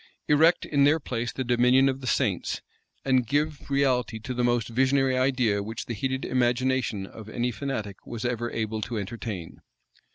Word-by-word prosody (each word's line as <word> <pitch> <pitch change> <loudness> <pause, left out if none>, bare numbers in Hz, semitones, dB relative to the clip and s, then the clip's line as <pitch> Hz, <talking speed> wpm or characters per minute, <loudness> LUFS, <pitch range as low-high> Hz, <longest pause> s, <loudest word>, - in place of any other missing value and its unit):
Erect 160 +4 +4
in 140 -2 +2
their 150 +3 +4
place 120 -4 -3
the 130 - -3
dominion 125 +2 +4
of 135 0 -1
the 130 - -6
saints, - - 0 0.4
and 130 -3 +2
give 145 +3 -1
reality 130 -4 +1
to 125 +4 -5
the 125 0 -1
most 120 -2 +1
visionary 130 +2 +2
idea 125 -6 +2
which 110 +3 -5
the 120 - -4
heated 130 +4 -2
imagination 125 -4 +1
of 110 +2 -11
any 120 +2 -1
fanatic 110 -6 -4
was 115 0 -6
ever 120 -1 -1
able 110 -1 -3
to 115 +2 -3
entertain? 105 -4 -6
125 Hz, 170 wpm, -26 LUFS, 115-135 Hz, 0.4 s, Erect